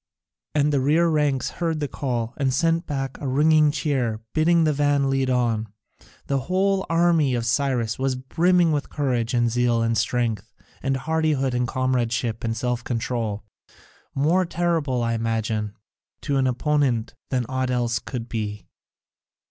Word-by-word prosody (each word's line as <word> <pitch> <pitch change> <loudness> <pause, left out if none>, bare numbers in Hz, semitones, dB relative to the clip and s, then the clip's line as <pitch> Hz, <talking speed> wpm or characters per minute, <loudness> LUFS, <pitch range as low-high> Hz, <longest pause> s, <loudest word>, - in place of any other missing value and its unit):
And 150 0 +2
the 140 - +3
rear 155 +6 +3
ranks 150 -4 +1
heard 165 -2 0
the 145 - -1
call, 120 -4 -3
and 135 -2 +1
sent 165 +5 +1
back 135 -2 -3
a 140 - -3
ringing 150 +3 +4
cheer, 135 -7 -1
bidding 165 +2 +3
the 155 -1 +2
van 145 -1 +2
lead 135 -1 +1
on. 115 -3 +1 0.6
The 140 -1 0
whole 190 +1 +1
army 165 -5 +3
of 115 -1 -2
Cyrus 120 -3 0
was 135 0 0
brimming 170 +6 +2
with 145 -1 -1
courage 125 -5 -1
and 120 -1 +2
zeal 120 -1 +2
and 115 0 +1
strength 115 -4 -1 0.3
and 135 -1 0
hardihood 150 -2 0
and 125 0 0
comradeship 120 -3 -1
and 115 0 -2
self 125 0 -2
control; 115 -3 -2 0.7
more 160 +7 +3
terrible, 165 -7 0
I 115 0 0
imagine, 110 -2 -2 0.5
to 140 -2 -1
an 130 -1 +2
opponent 130 -3 0 0.2
than 125 -2 0
aught 130 0 -1
else 120 -2 0
could 120 -1 -6
be. 105 -4 -4
130 Hz, 155 wpm, -23 LUFS, 120-150 Hz, 0.7 s, ringing